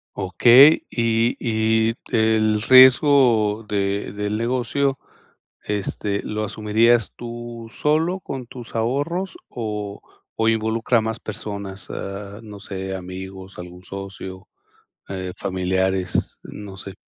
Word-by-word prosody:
Okey, 120 - +6
y 115 0 +1
y 110 0 +1 0.2
el 110 -2 +2
riesgo 125 -4 +6
de 100 -1 -1
del 105 +1 -3
negocio, 130 +3 0 0.6
este, 100 0 -2
¿lo 105 0 -3
asumirías 110 +2 +2
tú 120 -1 -8
solo 160 +7 0
con 135 -7 -6
tus 120 -2 -11
ahorros 145 - -1
o 105 -3 -5 0.3
o 110 0 +2
involucra 110 +2 +1
a - - -1
más 110 +1 -3
personas, 100 -2 -6
ah, 100 +2 -7
no 105 -2 -10
sé, 95 -1 -6
amigos, 95 +1 -8
algún 90 +1 -10
socio, 95 -1 -8 0.6
eh, 95 -1 -5
familiares, 95 0 -1
no 100 -2 -9
sé? 95 0 -8
110 Hz, 110 wpm, -22 LUFS, 100-120 Hz, 0.6 s, Okey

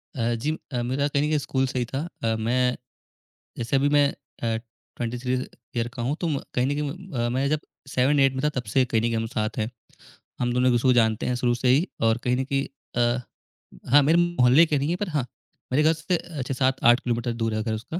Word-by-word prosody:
अ 120 -2 0
जी, 135 +7 -1 0.2
अ 120 - 0
मेरा 130 +4 0
कहीं 140 0 0
न - - +1
कहीं 155 - +2
स्कूल 135 -1 0
से 130 - -2
ही 120 - 0
था। 135 - -2 0.2
अ, 115 -1 +1
मैं 125 +3 +1 0.8
जैसे 120 +3 -1
अभी 140 +1 +3
मैं 145 -1 +5 0.4
अ, 115 -1 +1 0.4
23 125 +2 -2 0.4
ईयर 115 0 0
का 125 - -5
हूँ 130 +5 0
तो 175 - 0
म 145 -4 0
कहीं 125 - +1
न - - 0
कहीं 150 -1 -2 0.2
म 135 - -5
अ, - - 0
मैं 130 +3 0
जब 155 - +1 0.3
7-8 135 +1 +3
में 130 - -3
था 150 - +3
तब - - -6
से 130 -1 +4
कहीं 115 -3 0
न - - -4
कहीं 115 0 +1
हम 115 0 -1
साथ 110 0 -3
हैं। 110 0 -1 0.7
हम 120 0 0
दोनों 125 +1 +2
एक-दूसरे 120 +1 +2
को 125 - +6
जानते 110 -2 +2
हैं 125 - 0
शुरू 120 0 +1
से 125 +1 -1
ही 145 +9 +4 0.2
और 115 0 +3
कहीं 125 0 +2
न 130 - 0
कहीं, 135 0 0 0.3
अ 120 +1 +2 0.7
हाँ, 145 +2 +8
मेरे 160 +4 +4
मोहल्ले 165 -3 +5
के 150 -2 0
नहीं 140 +2 -1
हैं 175 - 0
पर 205 0 -3
हाँ, 145 -6 -1 0.5
मेरे 145 +4 +3
घर 160 +1 +5
से 165 +3 -1
अच्छा 140 -7 -5
7-8 130 -2 +3
किलोमीटर 120 0 -1
दूर 115 -1 0
है 110 0 -1
घर 110 -1 -2
उसका 120 +11 -5
130 Hz, 245 wpm, -25 LUFS, 120-145 Hz, 0.8 s, हाँ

